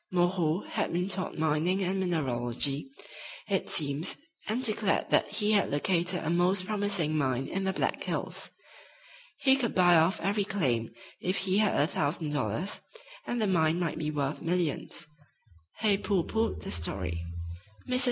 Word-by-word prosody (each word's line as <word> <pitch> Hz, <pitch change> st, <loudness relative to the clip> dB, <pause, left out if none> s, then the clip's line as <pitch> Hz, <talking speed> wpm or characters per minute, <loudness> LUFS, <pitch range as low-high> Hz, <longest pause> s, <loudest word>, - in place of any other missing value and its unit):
"Moreau" 175 Hz, -1 st, +1 dB
had -, -, -2 dB
been 180 Hz, +2 st, 0 dB
taught 185 Hz, -1 st, -3 dB
mining 160 Hz, +5 st, +1 dB
and 190 Hz, +1 st, -1 dB
mineralogy, 140 Hz, -, -1 dB, 0.6 s
it 195 Hz, -2 st, -1 dB
seems, 150 Hz, +3 st, +1 dB, 0.3 s
and 230 Hz, +4 st, -1 dB
declared 215 Hz, -4 st, +1 dB
that -, -, +4 dB
he 210 Hz, -1 st, +2 dB
had 205 Hz, -2 st, +3 dB
"located" 175 Hz, +4 st, +1 dB
a -, -, -2 dB
most 180 Hz, +2 st, +2 dB
promising 200 Hz, -7 st, +1 dB
mine 135 Hz, -3 st, 0 dB
in 195 Hz, +6 st, -3 dB
the 190 Hz, -, 0 dB
Black -, -, -1 dB
Hills. -, -, -4 dB, 0.9 s
He 265 Hz, -2 st, +6 dB
could 250 Hz, -4 st, -1 dB
buy 175 Hz, -2 st, +6 dB
off 165 Hz, +6 st, +3 dB
every 200 Hz, +1 st, 0 dB
claim 130 Hz, -, 0 dB, 0.3 s
if 185 Hz, +2 st, -1 dB
he 190 Hz, +1 st, +2 dB
had 210 Hz, -2 st, +2 dB
a 145 Hz, -, +5 dB
thousand 150 Hz, 0 st, -1 dB
dollars, 155 Hz, +6 st, -2 dB, 0.5 s
and 240 Hz, -, -1 dB
the 220 Hz, -, +2 dB
mine 165 Hz, -4 st, +2 dB
might 170 Hz, -3 st, -2 dB
be 150 Hz, -1 st, -1 dB
worth 145 Hz, -1 st, -2 dB
millions. 170 Hz, 0 st, -1 dB, 0.8 s
Hay 205 Hz, -3 st, +3 dB
pooh 195 Hz, -5 st, +1 dB
poohed 225 Hz, +4 st, -1 dB
the -, -, -5 dB
story. 90 Hz, -1 st, -1 dB, 0.6 s
Mrs. 255 Hz, 0 st, +1 dB
175 Hz, 160 wpm, -29 LUFS, 150-195 Hz, 0.9 s, He